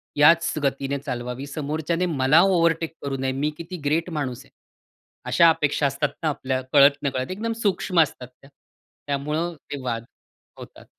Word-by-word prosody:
याच 165 Hz, +3 st, +5 dB
गतीने 140 Hz, 0 st, -1 dB
चालवावी, 125 Hz, -1 st, -5 dB
समोरच्याने 155 Hz, +4 st, -2 dB
मला 150 Hz, -2 st, +3 dB
ओव्हरटेक 170 Hz, -3 st, +2 dB
करू 140 Hz, -1 st, -3 dB
नये, 130 Hz, 0 st, -1 dB
मी 140 Hz, +3 st, -1 dB
किती 170 Hz, +2 st, -7 dB
ग्रेट 165 Hz, +4 st, +1 dB
माणूस 140 Hz, -7 st, -4 dB
आहे, -, -, -24 dB, 0.8 s
अशा 170 Hz, -1 st, +6 dB
अपेक्षा 150 Hz, -2 st, +1 dB
असतात 140 Hz, +2 st, -1 dB
ना, 155 Hz, -, +2 dB
आपल्या 130 Hz, -2 st, -2 dB
कळत-नकळत. 140 Hz, -1 st, +3 dB
एकदम 225 Hz, +4 st, -3 dB
सूक्ष्म 185 Hz, -3 st, +1 dB
असतात 130 Hz, -5 st, -2 dB
त्या. 130 Hz, +2 st, -21 dB, 0.6 s
त्यामुळं 150 Hz, +5 st, -2 dB, 0.2 s
ते 145 Hz, -, -4 dB
वाद 115 Hz, -2 st, -3 dB, 0.5 s
होतात. -, -, -12 dB
145 Hz, 150 wpm, -24 LUFS, 135-165 Hz, 0.8 s, अशा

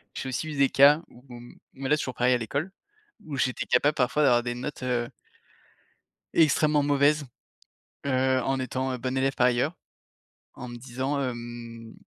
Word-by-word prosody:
j'ai 130 Hz, -, -4 dB
aussi 145 Hz, +5 st, -3 dB
eu 145 Hz, -, -6 dB
des 140 Hz, -1 st, +4 dB
cas 145 Hz, +3 st, +6 dB
où 120 Hz, -, -17 dB
où 120 Hz, -1 st, -9 dB
mmh 120 Hz, -, -14 dB, 0.2 s
mais 135 Hz, 0 st, -5 dB
là 150 Hz, -, +5 dB
c'est -, -, -3 dB
toujours 130 Hz, -, -5 dB
pareil 125 Hz, +1 st, +3 dB
à -, -, +3 dB
l'école, 140 Hz, -, -3 dB, 0.5 s
où 145 Hz, -3 st, -5 dB
j'étais 130 Hz, -1 st, -1 dB
capable 145 Hz, +5 st, +2 dB
parfois 125 Hz, +4 st, +1 dB
d'avoir 120 Hz, -3 st, +4 dB
des 120 Hz, 0 st, -3 dB
notes, 130 Hz, +1 st, -6 dB
heu 120 Hz, -2 st, -1 dB, 1.3 s
extrêmement 150 Hz, -1 st, +3 dB
mauvaises, 145 Hz, +1 st, +2 dB, 0.8 s
heu, 130 Hz, -1 st, +2 dB
en 135 Hz, 0 st, 0 dB
étant, 130 Hz, 0 st, -2 dB
heu, 125 Hz, -, -4 dB
bon 130 Hz, +2 st, -3 dB
élève 135 Hz, +1 st, +1 dB
par 125 Hz, -, +3 dB
ailleurs, 125 Hz, +7 st, +1 dB, 0.8 s
en 125 Hz, -, -8 dB
me 120 Hz, -, -8 dB
disant, 135 Hz, +3 st, -3 dB
hem: 120 Hz, -2 st, -6 dB
130 Hz, 185 wpm, -26 LUFS, 120-140 Hz, 1.3 s, cas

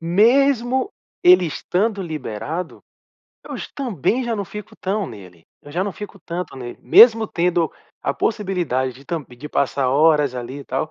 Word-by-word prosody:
mesmo 245 Hz, -, +3 dB, 0.3 s
ele 180 Hz, 0 st, +7 dB
estando 195 Hz, +6 st, -1 dB
liberado, 160 Hz, -, -5 dB, 0.7 s
hoje -, -, -6 dB
também 245 Hz, -, -1 dB
já 235 Hz, -1 st, -1 dB
não 200 Hz, -2 st, -3 dB
fico 210 Hz, +4 st, -9 dB
tão 195 Hz, 0 st, -2 dB
nele, 90 Hz, -7 st, -12 dB, 0.2 s
eu 145 Hz, -, -12 dB
já 185 Hz, +3 st, 0 dB
não 200 Hz, -, -3 dB
fico 205 Hz, 0 st, -9 dB
tanto 175 Hz, -3 st, -5 dB
nele, 120 Hz, -2 st, -8 dB
mesmo 225 Hz, -1 st, +7 dB
tendo 170 Hz, -3 st, 0 dB, 0.3 s
a -, -, -1 dB
possibilidade 175 Hz, -, -1 dB
de 135 Hz, -, -16 dB
tam 165 Hz, 0 st, -3 dB
de 125 Hz, +4 st, -11 dB
passar 140 Hz, -2 st, 0 dB
horas 150 Hz, -1 st, +3 dB
ali 125 Hz, +3 st, -6 dB
e -, -, -11 dB
tal 135 Hz, +4 st, -3 dB
175 Hz, 160 wpm, -21 LUFS, 140-210 Hz, 0.7 s, ele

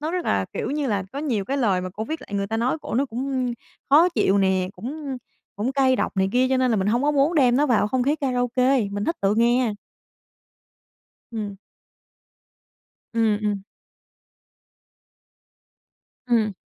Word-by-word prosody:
nó 310 Hz, +2 st, -2 dB
rất 360 Hz, 0 st, -2 dB
là, -, -, +1 dB
kiểu -, -, -3 dB
như 290 Hz, 0 st, -1 dB
là, 200 Hz, -6 st, -1 dB
có 275 Hz, -, -5 dB
nhiều 250 Hz, -10 st, -1 dB
cái 270 Hz, +7 st, -2 dB
lời 205 Hz, -9 st, +2 dB
mà 185 Hz, -, -4 dB
cổ 215 Hz, +4 st, -5 dB
viết 315 Hz, +7 st, -4 dB
lại -, -, -13 dB
người 200 Hz, 0 st, -1 dB
ta 225 Hz, +2 st, -2 dB
nói 245 Hz, +7 st, 0 dB
cổ -, -, -5 dB
nó 270 Hz, +4 st, +2 dB
cũng 255 Hz, 0 st, -2 dB, 0.4 s
khó 315 Hz, +6 st, +7 dB
chịu 200 Hz, -, +2 dB
nè, 190 Hz, -1 st, +2 dB
cũng 275 Hz, +2 st, -5 dB, 0.4 s
cũng 225 Hz, +6 st, -1 dB
cay 265 Hz, -2 st, +3 dB
độc -, -, -2 dB
này 190 Hz, 0 st, +2 dB
kia 255 Hz, +1 st, +3 dB
cho 265 Hz, -, +2 dB
nên 255 Hz, -1 st, +2 dB
là 225 Hz, -, +2 dB
mình 190 Hz, -1 st, 0 dB
hông 235 Hz, +5 st, +2 dB
có 295 Hz, -, +3 dB
muốn 290 Hz, +3 st, +2 dB
đem 255 Hz, -6 st, +4 dB
nó 290 Hz, +2 st, +3 dB
vào 230 Hz, -5 st, +2 dB
không 255 Hz, +2 st, 0 dB
khí 285 Hz, +4 st, +1 dB
karaoke, 255 Hz, -2 st, +1 dB
mình 205 Hz, 0 st, -3 dB
thích 330 Hz, -, -1 dB
tự 195 Hz, +1 st, +2 dB
nghe. 235 Hz, 0 st, +2 dB, 1.6 s
Ừm. 210 Hz, -4 st, -5 dB, 1.6 s
Ừm, 225 Hz, -2 st, +2 dB
ừm. 205 Hz, -2 st, -1 dB, 2.6 s
Ừm. 225 Hz, -4 st, +2 dB
245 Hz, 180 wpm, -23 LUFS, 210-275 Hz, 2.6 s, khó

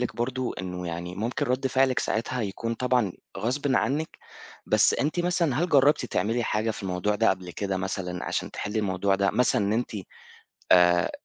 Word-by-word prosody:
لِك 125 Hz, -, -3 dB
برضه 125 Hz, +1 st, -2 dB
إنّه 90 Hz, -1 st, -5 dB
يعني 85 Hz, +1 st, -5 dB
ممكن 120 Hz, +8 st, -2 dB
رد 130 Hz, +2 st, 0 dB
فعلِك 130 Hz, -1 st, +2 dB
ساعتها 120 Hz, +2 st, -1 dB
يكون 115 Hz, +3 st, -3 dB
طبعًا 125 Hz, -6 st, +1 dB, 0.3 s
غصبٍ 130 Hz, +6 st, 0 dB
عنِّك، 150 Hz, +4 st, -1 dB, 0.5 s
بس -, -, +4 dB
أنتِ 155 Hz, +5 st, 0 dB
مثلًا 175 Hz, -5 st, +1 dB
هل 175 Hz, -, 0 dB
جرّبتِ 140 Hz, -3 st, +4 dB
تعملي 115 Hz, +5 st, 0 dB
حاجة 110 Hz, +1 st, 0 dB
في 110 Hz, -, -6 dB
الموضوع 95 Hz, +2 st, -1 dB
ده 115 Hz, +2 st, +3 dB
قَبل 90 Hz, -2 st, -4 dB
كده 95 Hz, +2 st, -2 dB
مثلًا 90 Hz, -1 st, -3 dB
عشان -, -, -2 dB
تحِلّي 105 Hz, +2 st, -3 dB
الموضوع 95 Hz, -1 st, +1 dB
ده، 100 Hz, 0 st, +2 dB
مثلًا 120 Hz, -4 st, +2 dB
إن 100 Hz, -, +1 dB
أنتِ 120 Hz, +3 st, -1 dB, 0.8 s
آآ 90 Hz, +1 st, +5 dB
110 Hz, 175 wpm, -26 LUFS, 95-130 Hz, 0.8 s, آآ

